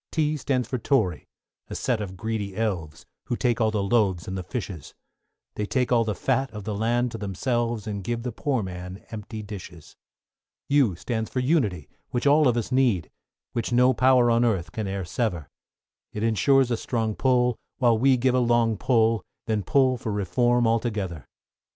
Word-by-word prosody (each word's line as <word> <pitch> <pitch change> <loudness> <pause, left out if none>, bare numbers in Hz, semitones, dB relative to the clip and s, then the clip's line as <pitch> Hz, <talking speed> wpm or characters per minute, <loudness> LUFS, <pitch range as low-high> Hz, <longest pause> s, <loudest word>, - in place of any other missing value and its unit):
=T= 155 -1 +1
stands 130 -4 -1
for 130 0 -3
Tory, 110 - 0 0.4
a - - -7
set 120 -4 -1
of 95 -2 -6
greedy 105 -1 -3
elves, 90 -9 -3 0.2
Who 120 - -2
take 120 -1 0
all 110 - +3
the 105 -2 -1
loaves 100 -5 +1
and 95 - -4
the 95 - -3
fishes; 90 - -6 0.6
They 105 - -3
take 125 +1 0
all 120 -2 +4
the 110 -2 -2
fat 135 0 0
of 105 -2 -8
the 105 +1 -3
land 120 +3 0
to 115 - -6
themselves, 115 +2 -1
And 100 -2 -4
give 115 +3 -3
the 125 - -3
poor 130 0 -1
man 90 +1 -7
empty 110 0 -6
dishes. 90 -6 -10 0.7
=U= 140 -10 +3
stands 110 +5 -3
for 130 - -2
Unity, 120 - +1 0.2
which 120 +1 -2
all 145 +1 +5
of 120 -1 +2
us 120 +2 -2
need, 120 -11 +2 0.4
Which 120 +1 -2
no 125 +2 +5
power 125 -1 +4
on 115 +1 +3
earth 100 -8 0
can 110 -4 -4
e'er 95 -1 -3
sever; 85 - -2 0.7
It 105 - -3
ensures 125 +3 +3
a 120 - +1
strong 110 -2 -1
pull, 125 -1 +2 0.2
while 120 -3 +4
we 130 +3 +4
give 125 +1 +2
a 130 - +3
long 120 -2 +2
pull, 115 -2 +2 0.2
Then 110 -2 0
pull 130 +5 +2
for 110 - -4
Reform 120 +5 +1
altogether. 105 - -1
115 Hz, 185 wpm, -25 LUFS, 100-125 Hz, 0.7 s, all